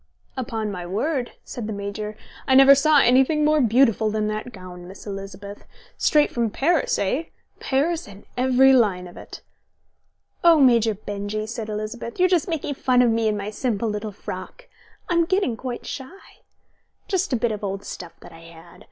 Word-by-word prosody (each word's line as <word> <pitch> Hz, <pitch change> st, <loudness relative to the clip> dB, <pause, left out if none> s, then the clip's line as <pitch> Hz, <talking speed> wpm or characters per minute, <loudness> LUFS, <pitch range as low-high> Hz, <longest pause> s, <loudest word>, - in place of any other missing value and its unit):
"Upon 225 Hz, -5 st, -3 dB
my 180 Hz, -3 st, -6 dB
word," 240 Hz, -, -2 dB
said 235 Hz, -4 st, -6 dB
the 220 Hz, -, -3 dB
Major, 205 Hz, +1 st, -5 dB, 0.3 s
"I 265 Hz, -, +4 dB
never 270 Hz, +1 st, +9 dB
saw 295 Hz, +2 st, +4 dB
anything 265 Hz, +5 st, +4 dB
more 305 Hz, 0 st, +3 dB
beautiful 230 Hz, -2 st, +3 dB
than 215 Hz, 0 st, -1 dB
that 215 Hz, +3 st, -4 dB
gown, 180 Hz, -3 st, -11 dB
Miss 190 Hz, -, -12 dB
Elizabeth. 200 Hz, 0 st, -8 dB, 0.3 s
Straight 300 Hz, -1 st, +3 dB
from 235 Hz, -2 st, 0 dB
Paris, 310 Hz, +8 st, +1 dB
eh? 260 Hz, +12 st, -1 dB, 0.3 s
Paris 305 Hz, +4 st, 0 dB
in 200 Hz, 0 st, -14 dB
every 260 Hz, +1 st, +4 dB
line 200 Hz, -8 st, +2 dB
of 175 Hz, -, -14 dB
it." -, -, -11 dB, 1.0 s
"Oh, 335 Hz, -2 st, +6 dB
Major 230 Hz, -5 st, +4 dB
Benjy," 205 Hz, +1 st, -4 dB
said 220 Hz, -1 st, -6 dB
Elizabeth. 215 Hz, +4 st, -5 dB
"You're 365 Hz, 0 st, +4 dB
all 355 Hz, -, +5 dB
making 320 Hz, -4 st, -2 dB
fun 255 Hz, -2 st, +2 dB
of 240 Hz, -, +3 dB
me 225 Hz, 0 st, +1 dB
and 210 Hz, -1 st, 0 dB
my 205 Hz, +1 st, -4 dB
simple 225 Hz, -1 st, -1 dB
little 210 Hz, 0 st, -4 dB
frock. -, -, -9 dB, 0.4 s
I'm 340 Hz, -1 st, +2 dB
getting 375 Hz, -, 0 dB
quite 245 Hz, +1 st, -6 dB
shy. 285 Hz, +9 st, -9 dB, 0.7 s
Just 380 Hz, -3 st, -1 dB
a -, -, +2 dB
bit 235 Hz, -1 st, 0 dB
of 210 Hz, -1 st, -5 dB
old 195 Hz, 0 st, -4 dB
stuff 175 Hz, -3 st, -9 dB
that -, -, -13 dB
I 165 Hz, -, -13 dB
had. 165 Hz, 0 st, -15 dB
230 Hz, 180 wpm, -23 LUFS, 205-270 Hz, 1.0 s, never